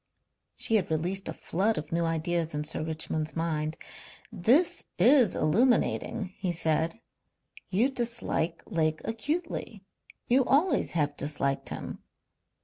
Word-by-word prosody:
She 225 Hz, -, +3 dB
had 200 Hz, -, -2 dB
released 175 Hz, +5 st, -1 dB
a -, -, -3 dB
flood 205 Hz, +6 st, 0 dB
of 150 Hz, -, -5 dB
new 170 Hz, 0 st, +1 dB
ideas 165 Hz, 0 st, -1 dB
in 150 Hz, -, -1 dB
Sir 155 Hz, +1 st, -2 dB
Richmond's 155 Hz, 0 st, -3 dB
mind. 160 Hz, -1 st, -1 dB, 0.5 s
"This 235 Hz, -, +3 dB
is 255 Hz, -9 st, +5 dB
illuminating," 200 Hz, +1 st, +1 dB
he 185 Hz, -2 st, -1 dB
said. 165 Hz, +4 st, 0 dB, 0.7 s
"You 205 Hz, +7 st, +3 dB
dislike 235 Hz, -10 st, -2 dB
Lake 155 Hz, -5 st, 0 dB
acutely. 230 Hz, -, -3 dB, 0.4 s
You 260 Hz, +2 st, +4 dB
always 310 Hz, +8 st, +2 dB
have 145 Hz, -3 st, 0 dB
disliked 140 Hz, -2 st, -1 dB
him." -, -, -6 dB
175 Hz, 125 wpm, -28 LUFS, 160-230 Hz, 0.7 s, is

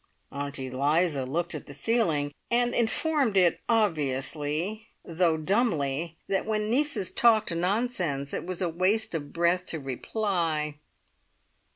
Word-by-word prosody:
Aunt 140 Hz, 0 st, -4 dB
Eliza 140 Hz, +2 st, 0 dB
looked 170 Hz, +6 st, -1 dB
at 150 Hz, -, -6 dB
the 145 Hz, -, -7 dB
ceiling, 155 Hz, -, +1 dB, 0.2 s
and 245 Hz, 0 st, +2 dB
informed 240 Hz, 0 st, +1 dB
it 180 Hz, -2 st, +4 dB
obviously, 155 Hz, -, 0 dB, 0.2 s
though 165 Hz, -1 st, +1 dB
dumbly, 165 Hz, -, 0 dB
that 195 Hz, +1 st, -1 dB
when 215 Hz, 0 st, 0 dB
nieces 270 Hz, -, +1 dB
talked 220 Hz, -5 st, +3 dB
nonsense 180 Hz, -, -1 dB
it -, -, -2 dB
was 185 Hz, 0 st, -5 dB
waste 185 Hz, +6 st, +1 dB
of 145 Hz, -3 st, -4 dB
breath 175 Hz, +2 st, +1 dB
to 160 Hz, -, -2 dB
reply. 155 Hz, -, -2 dB
170 Hz, 125 wpm, -27 LUFS, 145-215 Hz, 0.2 s, it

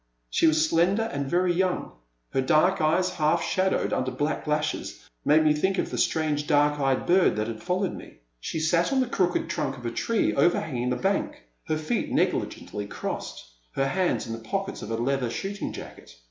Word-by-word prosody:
She 165 Hz, -, +3 dB
was 155 Hz, 0 st, +3 dB
slender 180 Hz, +7 st, +2 dB
and 140 Hz, -1 st, -2 dB
very 180 Hz, +2 st, +2 dB
young. 185 Hz, 0 st, 0 dB, 0.4 s
Her 135 Hz, -, +1 dB
dark 155 Hz, +7 st, +3 dB
eyes, 180 Hz, +4 st, +2 dB
half 165 Hz, -1 st, +1 dB
shadowed 190 Hz, 0 st, 0 dB
under 130 Hz, 0 st, 0 dB
black 145 Hz, +4 st, -2 dB
lashes, 150 Hz, 0 st, -2 dB, 0.2 s
made 155 Hz, +1 st, +5 dB
me 155 Hz, -1 st, +4 dB
think 190 Hz, +6 st, 0 dB
of -, -, -1 dB
the -, -, -3 dB
strange, 150 Hz, -2 st, 0 dB
dark 145 Hz, 0 st, +3 dB
eyed 135 Hz, -2 st, +1 dB
bird 180 Hz, +1 st, +4 dB
that 105 Hz, 0 st, -1 dB
had 115 Hz, -1 st, -6 dB
followed 185 Hz, +1 st, -1 dB
me. -, -, -11 dB, 0.2 s
She 160 Hz, -, -4 dB
sat 170 Hz, -, +2 dB
on 270 Hz, -, +2 dB
the 260 Hz, -, +3 dB
crooked 185 Hz, -7 st, 0 dB
trunk 140 Hz, -5 st, -2 dB
of 120 Hz, -, -10 dB
a 115 Hz, -, -1 dB
tree 225 Hz, -, 0 dB
over 175 Hz, -, +3 dB
hanging 125 Hz, -6 st, -3 dB
the 125 Hz, -, +1 dB
bank, 295 Hz, -, -1 dB, 0.2 s
her 155 Hz, -2 st, 0 dB
feet 155 Hz, +9 st, -2 dB
negligently 105 Hz, -1 st, -1 dB
crossed, 100 Hz, -, -5 dB, 0.3 s
her 135 Hz, 0 st, 0 dB
hands 185 Hz, +3 st, 0 dB
in 115 Hz, -, -5 dB
the 115 Hz, -, -5 dB
pockets 195 Hz, -, -4 dB
of -, -, -7 dB
a 115 Hz, -, -1 dB
leather 125 Hz, +1 st, 0 dB
shooting 200 Hz, -, -4 dB
jacket. -, -, -10 dB
155 Hz, 200 wpm, -26 LUFS, 135-185 Hz, 0.4 s, made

